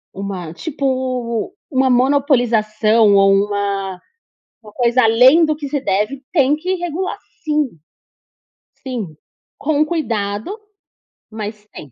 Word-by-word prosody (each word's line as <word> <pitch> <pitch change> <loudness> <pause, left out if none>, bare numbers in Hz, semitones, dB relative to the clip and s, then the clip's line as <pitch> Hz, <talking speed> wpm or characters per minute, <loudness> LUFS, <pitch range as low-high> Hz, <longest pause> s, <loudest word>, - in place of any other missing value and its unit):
uma 190 -4 -5
tipo, 255 - -2 0.2
uma 265 -3 +2
monopolização 235 -5 +3
ou 195 0 +5
uma 200 -2 -1 0.6
uma 210 -1 -14
coisa 240 +2 +2
além 250 +8 +6
do 310 -1 +1
que 290 -2 -6
se 285 +1 -1
deve, 215 +3 -1
tem 290 -3 +3
que 365 +5 -2
regular, 350 +1 -4 0.2
sim. 300 -2 0 1.2
Sim, 210 - -5 0.4
com 300 0 +1
cuidado, 230 - -3 0.8
mas 210 -1 -7
tem. 145 - -11
245 Hz, 110 wpm, -18 LUFS, 205-285 Hz, 1.2 s, além